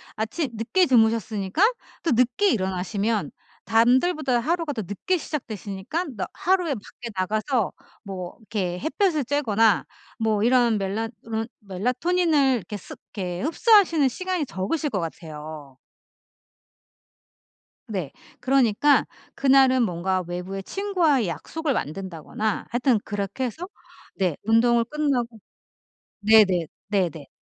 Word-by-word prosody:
아침 235 Hz, +7 st, -2 dB
늦게 230 Hz, -, +2 dB
주무셨으니까 220 Hz, -, +2 dB, 0.4 s
또 330 Hz, -, +1 dB
늦게 250 Hz, -, +3 dB
일어나시면 200 Hz, -, -1 dB, 0.3 s
남들보다 250 Hz, +3 st, +3 dB
하루가 330 Hz, +2 st, -1 dB
더 225 Hz, -, -3 dB
늦게 205 Hz, -, -1 dB
시작되시니까 220 Hz, -, -4 dB
남 -, -, -2 dB
하루에 360 Hz, -4 st, +1 dB
밖에 235 Hz, +2 st, -9 dB
나가서 215 Hz, +5 st, 0 dB, 0.3 s
뭐 185 Hz, -3 st, -6 dB
이렇게 200 Hz, -6 st, -3 dB
햇볕을 325 Hz, -, +1 dB
쬐거나 225 Hz, -6 st, +2 dB, 0.3 s
뭐 215 Hz, -2 st, +1 dB
이런 240 Hz, -2 st, +4 dB
멜라 200 Hz, +3 st, -2 dB, 0.2 s
이런 225 Hz, 0 st, -3 dB, 0.2 s
melatonin을 270 Hz, -, +2 dB
이렇게 210 Hz, 0 st, -7 dB
습 205 Hz, -, -10 dB, 0.2 s
이렇게 180 Hz, -3 st, -3 dB
흡수하시는 335 Hz, -, +4 dB
시간이 365 Hz, +3 st, -2 dB
적으실 285 Hz, +13 st, -2 dB
것 205 Hz, -7 st, -2 dB
같아요. 155 Hz, -4 st, -7 dB, 2.1 s
네. 185 Hz, -, -4 dB, 0.3 s
그러니까 265 Hz, +1 st, +3 dB, 0.3 s
그날은 265 Hz, -2 st, +5 dB
뭔가 185 Hz, -1 st, -1 dB
외부의 180 Hz, +2 st, -5 dB
친구와의 340 Hz, -, +1 dB
약속을 305 Hz, -, -3 dB
만든다거나 190 Hz, -, -3 dB
하여튼 245 Hz, -1 st, +2 dB
그렇게 205 Hz, +5 st, -3 dB
해서 320 Hz, +9 st, -5 dB, 0.5 s
네. 180 Hz, -6 st, 0 dB
운동을 230 Hz, +2 st, +3 dB
끝나고 245 Hz, -5 st, -1 dB, 0.8 s
네네. 200 Hz, -6 st, +5 dB, 0.2 s
네네. 170 Hz, -8 st, -1 dB
225 Hz, 300 characters per minute, -24 LUFS, 195-285 Hz, 2.1 s, 그날은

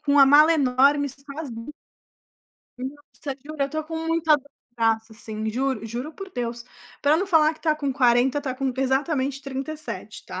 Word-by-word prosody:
com 285 Hz, -, +2 dB
uma 280 Hz, -2 st, +8 dB
mala 300 Hz, +4 st, +7 dB
enorme, 280 Hz, +1 st, +3 dB
sozinha. 275 Hz, -2 st, -8 dB, 1.1 s
Nossa, 280 Hz, +1 st, -7 dB
juro, 305 Hz, -2 st, -3 dB
eu 275 Hz, -, -1 dB
tô 310 Hz, 0 st, -3 dB
com 325 Hz, 0 st, -5 dB
muita 325 Hz, -2 st, +3 dB
dor 270 Hz, -, -11 dB, 0.3 s
no -, -, -42 dB
braço, 225 Hz, -1 st, +1 dB
assim. 220 Hz, 0 st, -5 dB
Juro 250 Hz, -2 st, -1 dB
juro 245 Hz, +8 st, -5 dB
por 390 Hz, +2 st, -9 dB
Deus. 235 Hz, -2 st, -4 dB, 0.4 s
Para 295 Hz, +2 st, +4 dB
não 385 Hz, +3 st, 0 dB
falar 320 Hz, -3 st, +4 dB
que -, -, -21 dB
tá 310 Hz, -2 st, +2 dB
com 285 Hz, -3 st, -2 dB
40, 250 Hz, +1 st, +3 dB
tá 260 Hz, -3 st, -3 dB
com 265 Hz, -1 st, -1 dB
exatamente 270 Hz, +1 st, 0 dB
37, 280 Hz, +3 st, -6 dB
tá? -, -, -6 dB
275 Hz, 180 wpm, -24 LUFS, 250-305 Hz, 1.1 s, uma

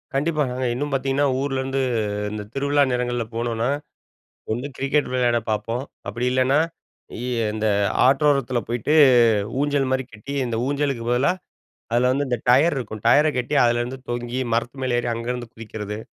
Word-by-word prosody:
கண்டிப்பாங்க. 150 Hz, -3 st, 0 dB, 0.2 s
இன்னும் 145 Hz, +4 st, -3 dB
பார்த்தீங்கன்னா, 135 Hz, +1 st, +1 dB
ஊரிலருந்து 135 Hz, -1 st, -1 dB, 0.5 s
இந்த 105 Hz, -1 st, -5 dB
திருவிழா 140 Hz, +1 st, +2 dB
நேரங்கள்ல 120 Hz, -1 st, -1 dB
போனோன்னா, 115 Hz, 0 st, -1 dB, 0.9 s
வந்து 125 Hz, +5 st, -3 dB
கிரிக்கெட் 140 Hz, 0 st, 0 dB
விளையாடப் 120 Hz, -3 st, +1 dB
பார்ப்போம். 115 Hz, +4 st, -2 dB, 0.2 s
அப்பிடி 115 Hz, +4 st, -2 dB
இல்லன்னா, 130 Hz, +2 st, +3 dB, 0.6 s
இ -, -, -4 dB, 0.3 s
இந்த 110 Hz, 0 st, -1 dB, 0.4 s
ஆற்றோரத்தில 135 Hz, -3 st, +2 dB
போயிட்டு 120 Hz, +6 st, 0 dB, 0.7 s
ஊஞ்சல்மாரி 135 Hz, -2 st, +1 dB
கட்டி, 110 Hz, +6 st, -7 dB
இந்த 115 Hz, -2 st, -2 dB
ஊஞ்சலுக்கு 140 Hz, -4 st, -1 dB
பதிலா 125 Hz, +7 st, +3 dB, 0.6 s
அதில 125 Hz, +2 st, +3 dB
வந்து 140 Hz, +2 st, 0 dB
இந்த 125 Hz, -1 st, 0 dB
டயர் 140 Hz, +5 st, +5 dB
இருக்கும். 110 Hz, -4 st, -6 dB
டயர 145 Hz, +6 st, +6 dB
கட்டி 125 Hz, +4 st, -1 dB
அதுலருந்து 120 Hz, +2 st, 0 dB
தொங்கி 120 Hz, +1 st, -3 dB
மரத்து 120 Hz, +3 st, -2 dB
மேலே 125 Hz, -2 st, +1 dB
ஏறி 120 Hz, -, -1 dB
அங்கருந்து 120 Hz, 0 st, -4 dB
குதிக்கிறது. 105 Hz, -2 st, -6 dB
125 Hz, 140 wpm, -23 LUFS, 120-140 Hz, 0.9 s, டயர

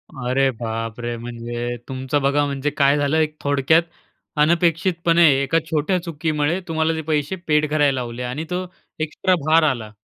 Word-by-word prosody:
अरे 135 Hz, +1 st, +1 dB
बापरे! 115 Hz, +1 st, -4 dB
म्हणजे 120 Hz, +1 st, -5 dB
तुमचं 130 Hz, +2 st, -2 dB
बघा 140 Hz, +2 st, +2 dB
म्हणजे 140 Hz, 0 st, -2 dB
काय 140 Hz, 0 st, +3 dB
झालं 145 Hz, +2 st, +1 dB
एक 155 Hz, -1 st, 0 dB
थोडक्यात 145 Hz, +4 st, +3 dB, 0.6 s
अनपेक्षितपणे 170 Hz, +1 st, +3 dB, 0.2 s
एका 165 Hz, +4 st, +2 dB
छोट्या 160 Hz, +4 st, 0 dB
चुकीमुळे 155 Hz, 0 st, -1 dB
तुम्हाला 160 Hz, 0 st, 0 dB
जे 160 Hz, -, -3 dB
पैसे 150 Hz, +2 st, -1 dB
पेड 150 Hz, -1 st, +2 dB
करायला 145 Hz, -3 st, +2 dB
लावले. 120 Hz, 0 st, -5 dB
आणि 130 Hz, +6 st, -4 dB
तो 180 Hz, +1 st, -2 dB, 0.3 s
एक्स्ट्रा 160 Hz, +4 st, 0 dB
भार 160 Hz, +1 st, +5 dB
आला. 115 Hz, -5 st, -4 dB
145 Hz, 150 wpm, -21 LUFS, 130-160 Hz, 0.6 s, भार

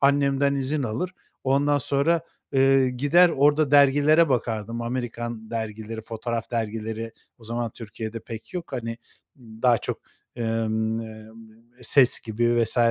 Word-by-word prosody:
Annemden 140 Hz, 0 st, +3 dB
izin 140 Hz, +2 st, -1 dB
alır, 130 Hz, +11 st, -3 dB, 0.3 s
ondan 145 Hz, +2 st, +2 dB
sonra, 140 Hz, +6 st, +2 dB, 0.3 s
eee, 135 Hz, -1 st, +4 dB
gider 145 Hz, +8 st, +4 dB
orada 145 Hz, -1 st, +3 dB
dergilere 145 Hz, +3 st, +5 dB
bakardım. 115 Hz, -2 st, -2 dB
Amerikan 120 Hz, -2 st, -5 dB
dergileri, 110 Hz, 0 st, -5 dB
fotoğraf 115 Hz, 0 st, -4 dB
dergileri 115 Hz, 0 st, -3 dB, 0.3 s
o 115 Hz, -, -17 dB
zaman 115 Hz, 0 st, -3 dB
Türkiye'de 110 Hz, 0 st, -7 dB
pek 115 Hz, -, -10 dB
yok. 175 Hz, -4 st, -6 dB
Hani, 115 Hz, -2 st, -4 dB, 0.4 s
daha 115 Hz, 0 st, +1 dB
çok, -, -, -4 dB, 0.4 s
emm, 110 Hz, -1 st, -1 dB
eee, 110 Hz, -1 st, -9 dB, 0.6 s
"Ses" 130 Hz, -4 st, +5 dB
gibi 120 Hz, +2 st, +1 dB
vs. 115 Hz, -, -3 dB
120 Hz, 125 wpm, -24 LUFS, 115-140 Hz, 0.6 s, dergilere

